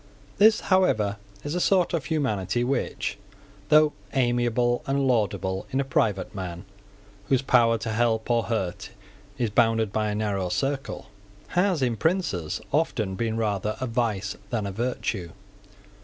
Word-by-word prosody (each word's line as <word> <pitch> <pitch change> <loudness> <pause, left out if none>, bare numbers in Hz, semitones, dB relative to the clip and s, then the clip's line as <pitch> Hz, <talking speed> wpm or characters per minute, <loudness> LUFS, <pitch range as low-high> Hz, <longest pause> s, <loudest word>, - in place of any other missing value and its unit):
This, 215 +1 +6
however, 110 - +2 0.3
is 145 - -3
a 180 - 0
sort 180 -1 +2
of 160 -5 -1
humanity 120 - 0
which, 130 +1 -2 0.5
though 155 0 +6 0.2
amiable 120 -1 +2
and 135 0 +1
laudable 95 -5 0
in 135 - -1
a - - +2
private 105 -7 0
man 90 -2 -6 0.6
whose 135 -1 +3
power 115 -3 +4
to 110 0 -4
help 110 0 +1
or 115 -1 +2
hurt 105 -7 -3 0.5
is 115 -4 -1
bounded 115 -2 +2
by 110 -1 0
a 105 - -2
narrow 100 -4 -1
circle, 135 +6 -2 0.4
has 180 -5 +1
in 120 -3 0
princes 160 - 0
often 120 -10 0
been 110 +3 -2
rather 105 -1 -1
a 130 - -2
vice 115 -5 -1
than 110 -3 -1
a 100 - -3
virtue. 100 -5 -3
115 Hz, 145 wpm, -26 LUFS, 105-135 Hz, 0.6 s, This